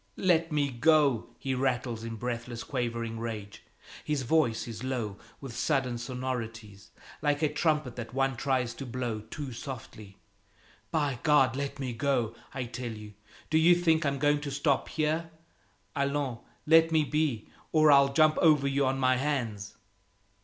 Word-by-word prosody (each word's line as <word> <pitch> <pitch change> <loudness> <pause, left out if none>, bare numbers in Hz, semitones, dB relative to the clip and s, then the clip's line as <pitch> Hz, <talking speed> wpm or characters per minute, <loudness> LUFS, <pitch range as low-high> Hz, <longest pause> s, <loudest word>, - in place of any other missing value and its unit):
"Let 165 -3 +2
me 145 -2 +1
go!" 140 -1 +3
he 135 -1 -3
rattles 125 -3 -1
in 115 0 -5
breathless, 120 +1 -4
quavering 115 -3 -3
rage. 110 -3 -6 0.4
His 150 -3 -1
voice 125 -5 +1
is 115 +1 -7
low, 120 -6 -3 0.2
with 135 -4 -8
sudden 135 -5 0
sonorities, 115 -5 -5 0.3
like 145 0 +1
a 150 -1 +1
trumpet 150 -6 0
that 115 -2 -6
one 135 0 0
tries 125 -2 0
to 135 - -7
blow 120 -3 -3
too 130 +6 -7
softly. 110 -5 -9 0.7
"By 145 -6 0
God, 135 -5 +4
let 140 +1 -3
me 130 -3 -3
go, 120 -2 0 0.2
I 130 -1 -3
tell 120 0 -5
you! 105 -1 -10 0.4
Do 160 - +4
you 170 +2 +6
think 165 -2 +2
I'm 140 -1 0
going 145 +1 +2
to 145 - -4
stop 140 0 0
here? 160 +1 -1 0.7
Allons, 140 -3 -1 0.3
let 165 +1 +6
me 160 -1 +4
be, 145 -5 -1 0.2
or 155 -1 +5
I'll 140 -1 +6
jump 155 +2 +4
over 150 -5 +4
you 140 0 +1
on 135 +1 0
my 130 -1 +3
hands!" 120 -8 -2
135 Hz, 160 wpm, -29 LUFS, 120-150 Hz, 0.7 s, you